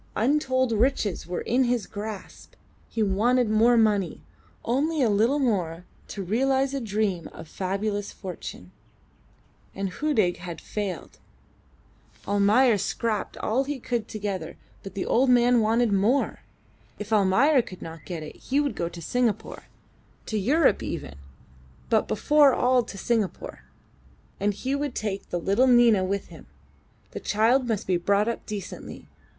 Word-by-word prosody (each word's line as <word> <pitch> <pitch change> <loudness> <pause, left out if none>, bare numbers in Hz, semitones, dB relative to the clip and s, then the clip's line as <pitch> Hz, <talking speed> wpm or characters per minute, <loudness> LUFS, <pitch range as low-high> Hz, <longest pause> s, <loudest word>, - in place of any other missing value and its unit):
Untold 260 0 +1
riches 220 -6 0
were 175 0 -3
in 255 +2 +1
his 240 -4 0
grasp; 210 -1 -8 0.4
he 225 - -1
wanted 220 +4 +2
more 230 +3 +4
money 210 -5 +1 0.4
only 285 +5 +1
a 225 - +3
little 225 +8 +2
more 180 - -1 0.2
torealise 265 +8 0
a 275 - -2
dream 205 -5 -1
of - - -10
fabulous 200 +4 -3
fortune. 175 - -8 1.0
And 195 0 -2
Hudig 215 -10 +1
had 175 -1 -7
failed! 205 -3 -5 1.1
Almayer 205 +3 +4
scraped 220 +1 -2
all 250 +5 0
he 290 0 -3
could 235 -2 -3
together, 195 -6 -5 0.2
but 195 0 -10
the 195 - -2
old 255 +2 +2
man 245 -1 +5
wanted 225 +1 +2
more. 215 +8 +1 0.6
If 210 +1 -5
Almayer 230 +8 +4
could 185 -5 -11
not 165 -1 -9
get 170 -4 -6
it 155 - -10
he 275 +2 -1
would 290 -2 0
go 170 - -2
to 170 -1 -10
Singapore 225 +1 -1 0.6
to 215 - -2
Europe 280 - +3
even, - - -5 0.8
but 220 - +3
before 290 +4 +4
all 250 0 +3
to 200 - -9
Singapore; 220 -2 -2 0.7
and 205 0 0
he 260 +6 -3
would 280 -2 -2
take 200 -2 -4
the 175 - -2
little 200 +9 +2
Nina 240 -5 +5
with 195 +1 -3
him. - - -13 0.6
The - - -6
child 235 +5 +2
must 220 -4 -1
be 185 -1 +1
brought 200 +4 +1
up 235 - -3
decently. 205 -3 -7
215 Hz, 145 wpm, -25 LUFS, 195-250 Hz, 1.1 s, man